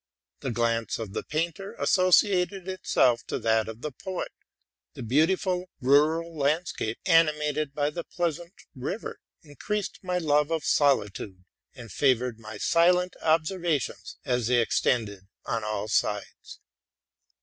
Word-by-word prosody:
The 135 Hz, -, -4 dB
glance 115 Hz, -1 st, 0 dB
of 110 Hz, -4 st, -6 dB
the -, -, -2 dB
painter 170 Hz, +5 st, -3 dB
be -, -, -17 dB
came -, -, -5 dB
associated 185 Hz, 0 st, +3 dB
with 130 Hz, -10 st, 0 dB
that 110 Hz, -1 st, +2 dB
of 110 Hz, +1 st, -8 dB
the 150 Hz, -, -4 dB
poet: 185 Hz, +7 st, -5 dB, 0.6 s
the -, -, -7 dB
beautiful 180 Hz, -, +1 dB
rural 155 Hz, +5 st, +3 dB
landscape, 145 Hz, -6 st, -1 dB
animated 150 Hz, -4 st, +2 dB
by 145 Hz, 0 st, 0 dB
the 170 Hz, +2 st, -5 dB
pleasant 170 Hz, +1 st, -3 dB, 0.2 s
river, 150 Hz, -, -5 dB, 0.2 s
increased 195 Hz, +7 st, -4 dB
my 180 Hz, -1 st, -2 dB
love 150 Hz, -3 st, +2 dB
of 165 Hz, -2 st, -1 dB
solitude, 105 Hz, -9 st, +1 dB, 0.3 s
and 120 Hz, -4 st, -10 dB
favored 125 Hz, -4 st, +1 dB
my 110 Hz, -1 st, -9 dB
silent 180 Hz, -, +3 dB
observations 160 Hz, -2 st, 0 dB
as 125 Hz, -3 st, 0 dB
they 125 Hz, 0 st, +3 dB
extended 105 Hz, -4 st, 0 dB, 0.2 s
on 115 Hz, -1 st, -2 dB
'all 105 Hz, -1 st, -3 dB
sides. 105 Hz, -1 st, -2 dB
150 Hz, 130 wpm, -27 LUFS, 115-175 Hz, 0.6 s, associated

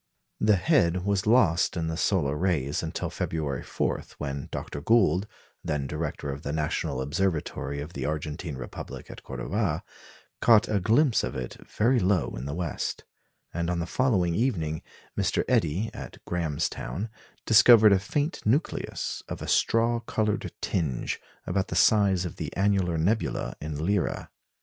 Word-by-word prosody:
The 105 Hz, -1 st, +4 dB
head 90 Hz, 0 st, +2 dB
was 100 Hz, 0 st, 0 dB
lost 95 Hz, -7 st, +4 dB
in 85 Hz, -, -1 dB
the 80 Hz, 0 st, -2 dB
solar 80 Hz, -5 st, +1 dB
rays 75 Hz, -5 st, 0 dB
until -, -, -3 dB
February 70 Hz, -6 st, -2 dB
4, -, -, -1 dB, 0.2 s
when 70 Hz, -1 st, -4 dB
Dr. 70 Hz, -, -5 dB
Gould, 100 Hz, -1 st, +3 dB, 0.4 s
then 75 Hz, -3 st, -1 dB
director 75 Hz, -1 st, -3 dB
of 70 Hz, +1 st, -6 dB
the 70 Hz, -, -4 dB
National 75 Hz, -3 st, -1 dB
Observatory 75 Hz, -2 st, -1 dB
of 75 Hz, +4 st, -8 dB
the -, -, -3 dB
Argentine 75 Hz, +1 st, -3 dB
Republic 60 Hz, -2 st, -8 dB
at -, -, -10 dB
Cordoba, -, -, -2 dB, 0.6 s
caught 115 Hz, -3 st, +6 dB
a 105 Hz, -2 st, +1 dB
glimpse 115 Hz, -, +3 dB
of -, -, -3 dB
it 65 Hz, -2 st, -4 dB
very 120 Hz, +4 st, +2 dB
low 95 Hz, -2 st, +2 dB
in -, -, -5 dB
the 70 Hz, +1 st, -4 dB
west; 85 Hz, -3 st, -3 dB, 0.5 s
and 85 Hz, 0 st, -1 dB
on 90 Hz, -, 0 dB
the 85 Hz, -, -1 dB
following 95 Hz, -5 st, +1 dB
evening, 85 Hz, -9 st, 0 dB, 0.3 s
Mr. -, -, +1 dB
Eddie, 85 Hz, +8 st, +1 dB
at -, -, -8 dB
Graham's 80 Hz, -3 st, -1 dB
Town, 105 Hz, +5 st, -5 dB, 0.4 s
discovered 110 Hz, -2 st, +8 dB
a 95 Hz, -, +4 dB
faint 145 Hz, -, -2 dB
nucleus, 135 Hz, +10 st, -1 dB
of -, -, -4 dB
a -, -, -6 dB
straw 115 Hz, +1 st, +2 dB
coloured 110 Hz, -3 st, -1 dB
tinge, 75 Hz, -9 st, -1 dB, 0.2 s
about 95 Hz, +1 st, 0 dB
the -, -, -4 dB
size 100 Hz, -4 st, +4 dB
of 85 Hz, -, -6 dB
the -, -, -4 dB
annular 95 Hz, -4 st, +2 dB
nebula 100 Hz, +8 st, 0 dB
in 75 Hz, 0 st, -4 dB
Lyra. 100 Hz, -2 st, -1 dB
90 Hz, 155 wpm, -27 LUFS, 75-105 Hz, 0.6 s, discovered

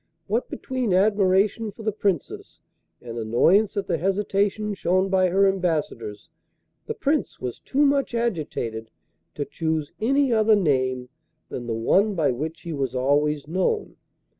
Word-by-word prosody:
What 225 Hz, +5 st, -1 dB
between 250 Hz, -7 st, -2 dB
admiration 200 Hz, +2 st, +2 dB
for 220 Hz, +3 st, -12 dB
the 215 Hz, -, 0 dB
Princess 195 Hz, -6 st, -3 dB, 0.4 s
and 120 Hz, -1 st, -6 dB
annoyance 170 Hz, -, +3 dB
at 200 Hz, -, 0 dB
the 170 Hz, -3 st, -1 dB
hesitation 200 Hz, +2 st, 0 dB
shown 185 Hz, 0 st, +1 dB
by 185 Hz, -1 st, +3 dB
her 195 Hz, +2 st, +4 dB
ambassadors 155 Hz, -, -2 dB, 0.6 s
the -, -, -3 dB
Prince 295 Hz, +2 st, -1 dB
was 125 Hz, -2 st, -5 dB
too 280 Hz, -, -1 dB
much 275 Hz, -3 st, +1 dB
agitated 150 Hz, -, -2 dB, 0.5 s
to 145 Hz, -, -2 dB
choose 155 Hz, +1 st, -2 dB
any 270 Hz, +2 st, +2 dB
other 220 Hz, -1 st, +4 dB
name 130 Hz, -8 st, 0 dB, 0.4 s
than 120 Hz, -1 st, -6 dB
the 115 Hz, -, -1 dB
one 195 Hz, -, +2 dB
by 155 Hz, -6 st, +2 dB
which 155 Hz, +6 st, -5 dB
he 170 Hz, -, -5 dB
was 135 Hz, -3 st, -2 dB
always 145 Hz, +3 st, +1 dB
known. 190 Hz, -, -1 dB
185 Hz, 145 wpm, -24 LUFS, 145-210 Hz, 0.6 s, her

